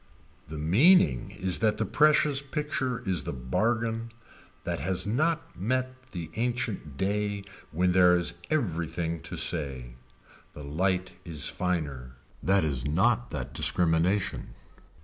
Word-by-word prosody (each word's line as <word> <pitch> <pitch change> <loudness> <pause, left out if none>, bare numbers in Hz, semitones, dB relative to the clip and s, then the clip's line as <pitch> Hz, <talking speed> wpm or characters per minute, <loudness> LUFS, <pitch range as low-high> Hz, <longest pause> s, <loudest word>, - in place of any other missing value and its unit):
The 80 - -7
meaning 85 - +4
is 95 -1 -1
that 110 -2 +2
the - - 0
precious 150 -2 +3
picture 140 -3 -3
is 95 -5 +1
the - - -4
bargain 115 - -1 0.5
that - - -2
has 95 +1 -1
not 155 +10 0
met 130 +5 -2
the 85 -4 -6
ancient 120 - -2
day 100 +1 -1 0.3
when 90 +3 +2
there 90 -1 +6
is 85 - 0 0.2
everything 85 - -1
to - - -7
say. 65 -5 -1 0.6
The 75 - -9
light 90 +5 0
is 80 -4 -4
finer. 70 -9 -3 0.3
That 95 -1 +3
is 70 -6 -1
not 110 - +2
that 65 -2 -5
discrimination. 90 +7 +1
95 Hz, 130 wpm, -28 LUFS, 80-120 Hz, 0.6 s, there